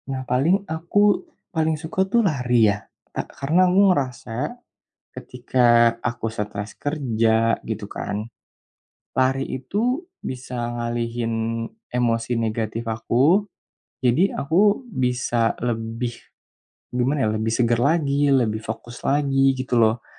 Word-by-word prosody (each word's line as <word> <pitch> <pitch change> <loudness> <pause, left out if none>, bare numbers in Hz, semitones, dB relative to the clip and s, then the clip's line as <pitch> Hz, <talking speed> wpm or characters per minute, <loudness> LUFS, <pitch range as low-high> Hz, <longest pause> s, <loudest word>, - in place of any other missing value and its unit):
Nah, 130 -1 -3
paling 155 +11 +2
aku 185 +6 +2 0.3
paling 160 -1 +1
suka 160 +4 -3
tuh 235 +2 +3
lari, 125 - +3 0.5
tak - - -3
karena 170 +7 +3
aku 185 +2 +3
ngerasa 125 -6 -3 0.7
ketika 120 -2 +2
aku 115 -2 -3
stres 105 -1 -5
kerja 115 -6 +1
gitu 110 -2 -4
kan, 105 +1 -3 0.9
lari 135 +1 +1
itu 235 - -1 0.2
bisa 125 -2 -4
ngalihin 120 0 -2 0.6
emosi 120 -1 0
negatif 115 0 -2
aku. 135 - +2 0.6
Jadi 130 +11 +4
aku 200 - +2
bisa 125 - 0
lebih 115 0 -3 0.7
gimana 130 +3 +1
ya, - - +2
lebih 110 +1 -1
segar 120 -1 +2
lagi, 145 0 +2
lebih 120 -6 +2
fokus 115 +2 -7
lagi 135 -1 +2
gitu 130 -2 0
loh. 110 +1 +2
125 Hz, 115 wpm, -23 LUFS, 115-145 Hz, 0.9 s, Jadi